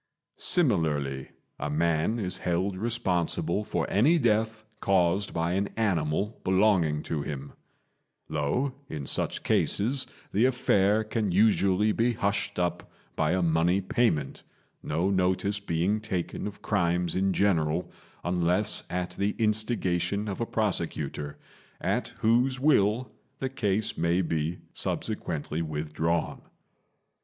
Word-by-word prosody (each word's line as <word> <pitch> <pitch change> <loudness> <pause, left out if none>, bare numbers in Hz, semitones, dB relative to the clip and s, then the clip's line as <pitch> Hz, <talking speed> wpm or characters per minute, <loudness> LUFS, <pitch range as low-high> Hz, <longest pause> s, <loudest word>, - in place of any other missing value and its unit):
Similarly, 75 - +1 0.3
a 75 - -2
man 80 +7 +1
is 95 -5 -2
held 90 +3 0
responsible 95 -3 0
for - - -2
any 140 +12 +4
death 110 -4 +1
caused 95 +1 +2
by 85 0 -1
an 100 +2 0
animal 100 -1 0
belonging 95 -6 +3
to 80 -3 -2
him; 70 -1 -6 0.7
though 80 - -1 0.2
in 75 -3 -5
such - - -2
cases 130 +6 +1 0.2
the 110 +5 +3
affair 110 -4 +3
can 110 -2 -1
usually 100 +1 +3
be 120 +3 +1
hushed 100 -2 -1
up 90 -1 -1 0.3
by 75 +2 +1
a 95 -1 +1
money 85 +3 +3
payment, 100 -4 0 0.4
no 85 +6 0
notice 95 +2 +1
being 95 +2 0
taken 105 -3 -3
of 100 - -9
crimes 85 0 +1
in 95 +1 +2
general 85 -4 +1 0.3
unless 90 +4 +1
at 90 0 -2
the 100 +1 -1
instigation 105 -3 0
of 100 +2 -4
a 115 - -1
prosecutor, 80 -8 -2 0.4
at - - 0
whose 125 +4 +3
will 125 -4 +3 0.3
the 130 - -2
case 105 -5 0
may 85 +2 +2
be 80 +1 -1 0.2
subsequently 80 0 -3
withdrawn. 80 +1 -2
95 Hz, 120 wpm, -28 LUFS, 85-110 Hz, 0.7 s, any